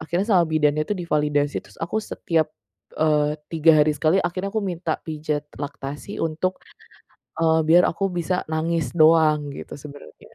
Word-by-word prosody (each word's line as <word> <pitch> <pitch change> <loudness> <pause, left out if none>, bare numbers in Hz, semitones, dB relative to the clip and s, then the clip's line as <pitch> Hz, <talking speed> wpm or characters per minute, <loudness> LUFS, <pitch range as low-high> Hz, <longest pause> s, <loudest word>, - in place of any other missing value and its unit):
Akhirnya 170 +4 -1
sama 180 -3 +5
bidannya 155 -1 +2
itu - - 0
divalidasi 150 -4 0
terus - - -18
aku 215 +6 -2
setiap, 165 -7 -1 0.5
eee, 150 -1 +2 0.2
3 160 0 +5
hari 150 - +2
sekali 155 +5 +2
akhirnya 185 +3 -2
aku 220 -1 -1
minta 175 -3 -2
pijat 150 -2 -3 0.2
laktasi 145 +5 -6
untuk, 165 +4 -2 0.8
eee, 160 -1 +3
biar 175 +2 +7
aku 195 +3 -2
bisa 180 +1 -1
nangis 160 -3 -1
doang 155 -2 +5
gitu - - -8
sebenernya. 145 0 -13
160 Hz, 150 wpm, -23 LUFS, 150-175 Hz, 0.8 s, biar